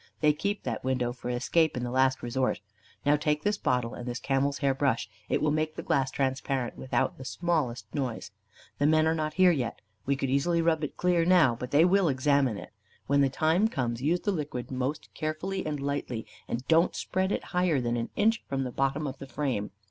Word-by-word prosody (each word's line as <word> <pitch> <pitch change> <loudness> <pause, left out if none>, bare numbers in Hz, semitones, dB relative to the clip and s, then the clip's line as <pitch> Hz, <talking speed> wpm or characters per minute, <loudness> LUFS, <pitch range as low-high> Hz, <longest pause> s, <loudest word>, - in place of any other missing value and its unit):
They 150 -1 +4
keep 200 +7 -2
that 115 -4 -3
window 125 -2 0
for 125 0 -7
escape 140 +5 +1
in 125 - -2
the 120 - -3
last 130 +1 +2
resort. 130 +2 0 0.5
Now 145 +1 +5
take 150 0 0
this 205 0 0
bottle 125 -2 0
and 120 - -7
this 120 0 -3
camel's 140 +2 0
hair 140 -2 +2
brush; 135 -3 0 0.2
it - - +1
will 155 - +3
make 155 +1 -1
the - - -5
glass 135 -1 +1
transparent 130 -1 -1
without 130 - -1
the - - -7
smallest 135 -4 -1
noise. 120 -8 -3 0.5
The 145 - +3
men 155 0 +4
are 160 - +3
not 155 -1 -2
there 185 -1 +7
yet. 125 -8 -2 0.3
We 140 - +2
could 135 -1 -2
easily 170 +5 +2
rub 165 -1 +2
it 150 - -4
clear 180 -2 +2
now, 170 -8 +5
but 125 +2 -6
they 145 +5 +5
will 185 -1 +4
examine 135 -3 +2
it. - - -10 0.3
When 140 0 +3
the 135 - +4
time 160 +9 +2
comes, 120 - -2
use 165 +6 +1
the 205 - 0
liquid 145 -9 -4
most 130 +4 -3
carefully 170 +5 -3
and 150 -1 -2
lightly, 140 -5 -3 0.2
and 125 +3 -4
don't 165 +2 +4
spread 190 +1 -1
it - - -1
higher 180 -5 +2
than 120 -1 -1
an 115 -1 -2
inch 225 +2 +2
from 135 -1 -1
the 125 - -4
bottom 135 +4 0
of 135 -1 -5
the 135 - -8
frame. 130 -6 -2
140 Hz, 215 wpm, -28 LUFS, 130-160 Hz, 0.5 s, there